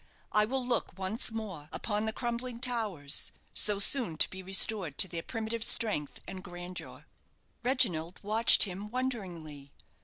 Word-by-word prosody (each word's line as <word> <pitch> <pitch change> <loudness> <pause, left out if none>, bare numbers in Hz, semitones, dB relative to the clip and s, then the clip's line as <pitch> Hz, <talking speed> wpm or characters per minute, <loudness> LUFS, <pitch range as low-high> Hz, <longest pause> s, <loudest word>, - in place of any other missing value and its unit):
"I 210 0 +4
will 260 +2 -1
look 245 -7 -1
once 195 +6 0
more 195 -10 -6
upon 210 -1 -2
the - - 0
crumbling 240 +1 -4
towers, 215 - 0 0.2
so 210 -1 +3
soon 200 - +3
to - - +3
be 190 - -6
restored 190 -4 +2
to - - +7
their 170 -2 -5
primitive 225 +3 -4
strength 210 -14 +1
and 185 -1 -7
grandeur." 175 +1 -9 0.6
Reginald 185 -10 +1
watched 220 +3 +6
him 200 +1 -3
wonderingly. 180 - -5
210 Hz, 145 wpm, -31 LUFS, 175-230 Hz, 0.6 s, to